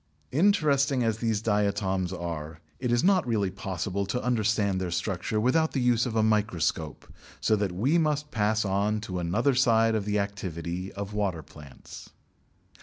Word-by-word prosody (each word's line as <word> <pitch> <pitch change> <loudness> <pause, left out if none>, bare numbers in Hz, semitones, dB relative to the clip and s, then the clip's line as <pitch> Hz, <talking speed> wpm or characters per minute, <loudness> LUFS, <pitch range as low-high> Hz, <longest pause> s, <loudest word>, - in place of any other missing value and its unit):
Interesting 140 -6 +3
as 110 -1 0
these 110 -2 -1
diatoms 100 -3 0
are, 80 -3 -5 0.2
it 125 -2 -1
is 120 0 +2
not 190 -7 +3
really 105 -5 0
possible 95 +1 -3
to 125 +5 -2
understand 110 -5 +1
their 90 - -2
structure 90 +4 -2
without 160 +8 +2
the 135 - 0
use 125 -1 +2
of 115 - -4
a 110 - +3
microscope, 100 -8 0 0.3
so 110 - +2
that 100 -3 -1
we 130 - +1
must 150 -2 0
pass 110 0 +1
on 100 +2 0
to 95 -3 -4
another 105 +11 +1
side 115 -3 +3
of 110 -2 -1
the 105 0 0
activity 95 -3 -4
of 100 +1 -6
water 95 -6 -1
plants. 70 -2 -13
105 Hz, 165 wpm, -27 LUFS, 95-120 Hz, 0.3 s, Interesting